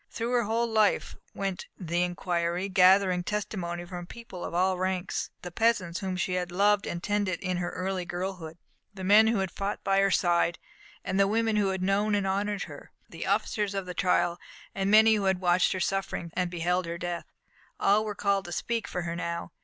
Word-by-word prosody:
Through 235 Hz, +1 st, -3 dB
her 245 Hz, -1 st, +3 dB
whole 230 Hz, +2 st, +1 dB
life 220 Hz, -2 st, +1 dB, 0.2 s
went 195 Hz, -2 st, -3 dB
the 175 Hz, -1 st, -1 dB
inquiry, 175 Hz, +1 st, -1 dB
gathering 185 Hz, -1 st, +5 dB
testimony 175 Hz, -4 st, -3 dB
from 175 Hz, 0 st, -7 dB
people 230 Hz, -6 st, -9 dB
of -, -, -4 dB
all 185 Hz, +1 st, +1 dB
ranks. 185 Hz, 0 st, -2 dB
The 180 Hz, -, -6 dB
peasants 195 Hz, -5 st, +1 dB
whom 190 Hz, -2 st, -3 dB
she 185 Hz, 0 st, -1 dB
had 180 Hz, -1 st, -2 dB
loved 200 Hz, +2 st, +3 dB
and 175 Hz, +1 st, -4 dB
tended 205 Hz, -4 st, 0 dB
in 185 Hz, -2 st, -2 dB
her 175 Hz, -1 st, -2 dB
early 185 Hz, 0 st, -3 dB
girlhood, 175 Hz, -2 st, -5 dB, 0.3 s
the 190 Hz, -2 st, -9 dB
men 210 Hz, +4 st, +6 dB
who 225 Hz, 0 st, +2 dB
had 190 Hz, -2 st, -1 dB
fought 200 Hz, +1 st, -4 dB
by 195 Hz, 0 st, +2 dB
her 195 Hz, 0 st, +4 dB
side, 175 Hz, -1 st, +2 dB, 0.5 s
the 195 Hz, +1 st, +2 dB
women 225 Hz, +1 st, +1 dB
who 205 Hz, -2 st, +2 dB
had 190 Hz, -1 st, -2 dB
known 205 Hz, +2 st, +2 dB
and 200 Hz, -1 st, 0 dB
honoured 200 Hz, +1 st, -1 dB
her, -, -, -11 dB, 0.2 s
the -, -, -6 dB
officers 205 Hz, -2 st, 0 dB
of 195 Hz, -1 st, -2 dB
the 180 Hz, -, -6 dB
trial, 175 Hz, -1 st, +1 dB, 0.3 s
and 195 Hz, 0 st, -1 dB
many 220 Hz, +1 st, +7 dB
who 205 Hz, -2 st, 0 dB
had 190 Hz, -1 st, +2 dB
watched 180 Hz, 0 st, +3 dB
her 185 Hz, -, -3 dB
sufferings 195 Hz, -3 st, -2 dB
and 180 Hz, -1 st, -1 dB
beheld 175 Hz, +1 st, -1 dB
her 170 Hz, 0 st, -4 dB
death 175 Hz, 0 st, -4 dB, 0.5 s
all 205 Hz, +2 st, +4 dB
were 210 Hz, -1 st, -4 dB
called 200 Hz, -1 st, 0 dB
to 175 Hz, -, -7 dB
speak 230 Hz, +5 st, -2 dB
for 180 Hz, -, -3 dB
her 170 Hz, 0 st, -3 dB
now. 170 Hz, -1 st, -4 dB
190 Hz, 200 wpm, -28 LUFS, 175-205 Hz, 0.5 s, many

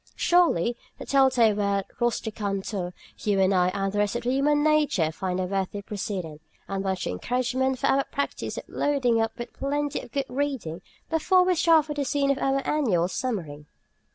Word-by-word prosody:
Surely 345 Hz, -, +3 dB
in 240 Hz, -, -4 dB, 0.2 s
the -, -, -8 dB
telltale 260 Hz, -6 st, +4 dB
word 200 Hz, -1 st, 0 dB
"rusticantur" 205 Hz, -5 st, -2 dB, 0.3 s
you 205 Hz, -2 st, +1 dB
and 190 Hz, 0 st, +3 dB
I 180 Hz, -1 st, +3 dB
and 195 Hz, +1 st, -2 dB
the 205 Hz, -, 0 dB
rest 205 Hz, +2 st, +1 dB
of 240 Hz, -, -2 dB
human 280 Hz, +4 st, +2 dB
nature 300 Hz, -, +2 dB
find 185 Hz, +2 st, -3 dB
a -, -, 0 dB
worthy 195 Hz, +2 st, -2 dB
precedent 185 Hz, -7 st, -5 dB, 0.3 s
and 195 Hz, 0 st, -3 dB
much 190 Hz, -2 st, -2 dB
encouragement 255 Hz, -, -1 dB
for -, -, -2 dB
our 275 Hz, 0 st, +3 dB
practice 280 Hz, -, -4 dB
of -, -, -4 dB
loading 250 Hz, -6 st, +1 dB
up 225 Hz, +1 st, -2 dB
with 240 Hz, -, -7 dB
plenty 290 Hz, +1 st, -2 dB
of 240 Hz, -, -11 dB
good 275 Hz, +1 st, -1 dB
reading 250 Hz, -, -3 dB, 0.3 s
before 365 Hz, +3 st, +4 dB
we 365 Hz, 0 st, +3 dB
start 325 Hz, -2 st, +4 dB
for 300 Hz, -, -4 dB
the 290 Hz, -1 st, -1 dB
scene 280 Hz, 0 st, +1 dB
of 275 Hz, -, -1 dB
our 270 Hz, 0 st, 0 dB
annual 215 Hz, -, +2 dB
summering. 175 Hz, -, -4 dB
235 Hz, 180 wpm, -26 LUFS, 195-275 Hz, 0.3 s, telltale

